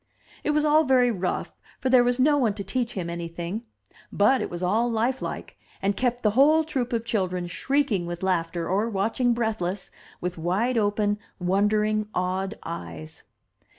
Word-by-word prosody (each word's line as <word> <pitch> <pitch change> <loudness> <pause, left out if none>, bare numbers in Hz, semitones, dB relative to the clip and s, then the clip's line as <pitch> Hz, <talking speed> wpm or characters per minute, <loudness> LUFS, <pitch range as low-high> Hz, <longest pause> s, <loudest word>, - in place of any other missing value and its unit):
It - - -1
was 300 0 +2
all 305 +1 +5
very 255 -3 +4
rough, 185 -4 -2 0.3
for 260 - -1
there 255 -2 +7
was 245 +1 +1
no 290 +3 +5
one 235 -8 +1
to 200 - -5
teach 240 +4 -2
him 180 -3 -3
anything. 170 +4 -4 0.5
But 255 +6 +3
it - - -3
was 175 +1 -5
all 220 +7 +2
Ufe 235 +3 0
like, - - -6 0.2
and 195 +1 0
kept 245 +1 -1
the 215 - +4
whole 295 +7 +5
troop 265 -6 -2
of 230 -1 -1
children 185 -6 -1
shrieking 230 -2 0
with 175 +1 -5
laughter, 170 -2 0
or 205 +5 +1
watching 230 +4 +1
breathless, 210 -5 -2 0.3
with 180 -1 -4
wide 195 +10 0
open, 205 0 +1 0.2
wondering, 210 +3 +1
awed 185 +3 -1
eyes 85 - -7
210 Hz, 170 wpm, -25 LUFS, 180-245 Hz, 0.5 s, there